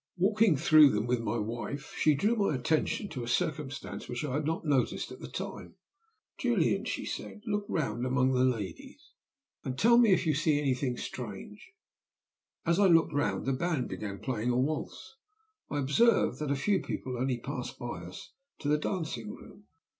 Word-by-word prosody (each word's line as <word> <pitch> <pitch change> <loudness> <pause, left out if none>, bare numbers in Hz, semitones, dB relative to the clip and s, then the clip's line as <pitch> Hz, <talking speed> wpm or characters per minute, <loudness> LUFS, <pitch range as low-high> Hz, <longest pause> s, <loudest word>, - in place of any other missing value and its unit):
Walking 205 -2 +3
through 155 +1 +7
them 105 -3 0
with 120 0 +1
my 115 0 -2
wife, 120 +6 -4
she 155 -1 +3
drew 210 +11 +2
my 200 -9 +1
attention 155 - 0
to 130 -6 -5
a - - -6
circumstance 145 0 -3
which 120 +4 -3
I 135 - -3
had 150 +2 -1
not 160 0 -2
noticed 140 -5 0
at - - -9
the - - -7
time. - - -7 0.6
'Julian,' - - +1
she - - -3
said, 210 - -6
'look 205 -2 -2
round 120 -7 -1
among 130 0 +2
the 125 0 +3
lades, 115 -7 -3 0.5
and 130 0 -4
tell 235 +7 +6
me 230 -4 +5
if 185 -1 +3
you 155 - +3
see 150 0 +2
anything 130 -3 0
strange.' - - -8 0.9
As 170 +3 +2
I 200 - +6
looked 165 -3 +4
round 145 0 0
the 135 - +1
band 155 -2 -1
began 100 -2 -5
playing 120 -1 -2
a 120 - +2
waltz. 155 - -3 0.5
I 145 - -2
observed 145 - +3
that 150 -2 -2
a 140 - +2
few 190 +8 +1
people 130 -1 -4
only 125 0 0
passed 125 +1 -6
by 120 -8 -5
us 90 +1 -10 0.2
to - - -6
the 150 0 +3
dancing 150 - -3
room. 205 - -12
140 Hz, 185 wpm, -30 LUFS, 125-165 Hz, 0.9 s, through